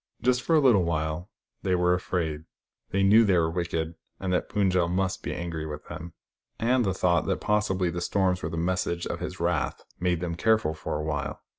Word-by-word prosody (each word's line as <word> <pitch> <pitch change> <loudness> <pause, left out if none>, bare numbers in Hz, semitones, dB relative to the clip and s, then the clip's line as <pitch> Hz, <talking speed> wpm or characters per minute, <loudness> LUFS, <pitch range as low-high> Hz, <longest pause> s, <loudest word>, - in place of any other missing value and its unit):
Just 125 0 +2
for 165 - +2
a - - +6
little 125 -9 +5
while, 80 +2 -2 0.3
they 95 -1 +1
were 90 0 +3
afraid. 80 -4 -2 0.4
They 95 0 +1
knew 105 +4 +7
they 100 -4 +3
were 80 -1 +2
wicked, 85 -2 -2 0.3
and 95 -1 -1
that 90 - 0
Pund 100 -3 +2
jel 90 -2 +2
must 95 +2 -1
be - - -4
angry 85 -2 -4
with 75 -1 -7
them; 85 0 -7 0.4
and 125 +2 +2
the 95 - +1
thought 90 -1 +2
that - - 0
possibly 95 -4 +1
the 85 +1 -4
storms 95 0 +1
were - - -3
the 80 - -4
message 85 0 -1
of 85 - -3
his 90 +1 -5
wrath 85 -1 -1 0.2
made 90 -1 +1
them 85 -1 -3
careful 110 -2 +2
for 75 -1 -4
awhile. 75 -1 -3
90 Hz, 205 wpm, -27 LUFS, 85-95 Hz, 0.4 s, knew